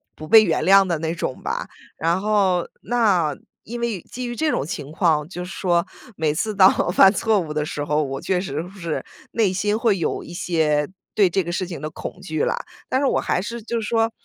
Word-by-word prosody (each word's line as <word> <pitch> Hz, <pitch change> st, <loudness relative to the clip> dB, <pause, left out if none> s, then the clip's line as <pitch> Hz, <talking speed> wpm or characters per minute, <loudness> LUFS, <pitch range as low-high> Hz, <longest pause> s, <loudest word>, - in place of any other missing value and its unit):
不 155 Hz, -, -9 dB
被 220 Hz, +4 st, +8 dB
原 165 Hz, -5 st, 0 dB
谅 195 Hz, +1 st, +6 dB
的 170 Hz, -4 st, -1 dB
那 165 Hz, +1 st, -2 dB
种 130 Hz, -, -4 dB
吧。 -, -, -3 dB, 0.3 s
然 170 Hz, +3 st, +1 dB
后 195 Hz, -4 st, +2 dB
那 200 Hz, -, +2 dB, 0.3 s
因 240 Hz, +3 st, -6 dB
为 225 Hz, -7 st, -2 dB
基 250 Hz, 0 st, -7 dB
于 240 Hz, -, -4 dB
这 310 Hz, +4 st, +1 dB
种 140 Hz, -, 0 dB
情 150 Hz, -2 st, -6 dB
况， 155 Hz, -2 st, +1 dB
就 180 Hz, -1 st, -6 dB
是 185 Hz, -, -9 dB
说， 175 Hz, -3 st, +1 dB, 0.3 s
每 155 Hz, -2 st, +1 dB
次 215 Hz, +5 st, -2 dB
当 190 Hz, -1 st, +7 dB
我 -, -, +1 dB
犯 190 Hz, +1 st, +7 dB
错 220 Hz, -1 st, +2 dB
误 155 Hz, -3 st, -4 dB
的 150 Hz, -, 0 dB
时 145 Hz, -1 st, -4 dB
候， 150 Hz, +1 st, +1 dB
我 135 Hz, -1 st, -4 dB
确 180 Hz, -2 st, 0 dB
实 155 Hz, -4 st, -3 dB
会 180 Hz, -, -10 dB
是 170 Hz, -3 st, -3 dB, 0.3 s
内 210 Hz, -5 st, +2 dB
心 205 Hz, +3 st, 0 dB
会 225 Hz, -4 st, +2 dB
有 160 Hz, -, -2 dB
一 170 Hz, -, -10 dB
些 155 Hz, -4 st, +1 dB, 0.2 s
对 200 Hz, -3 st, +4 dB
这 190 Hz, +2 st, +1 dB
个 175 Hz, -, -4 dB
事 185 Hz, 0 st, -2 dB
情 170 Hz, -, -6 dB
的 155 Hz, -, -3 dB
恐 -, -, -7 dB
惧 155 Hz, -1 st, -2 dB
啦。 -, -, 0 dB, 0.3 s
但 260 Hz, -, +1 dB
是 280 Hz, -, +1 dB
我 -, -, +2 dB
还 -, -, 0 dB
是 230 Hz, +4 st, -5 dB
就 235 Hz, +2 st, -2 dB
是 215 Hz, -, -4 dB
说， 225 Hz, -1 st, +1 dB
180 Hz, 255 characters per minute, -22 LUFS, 160-215 Hz, 0.3 s, 被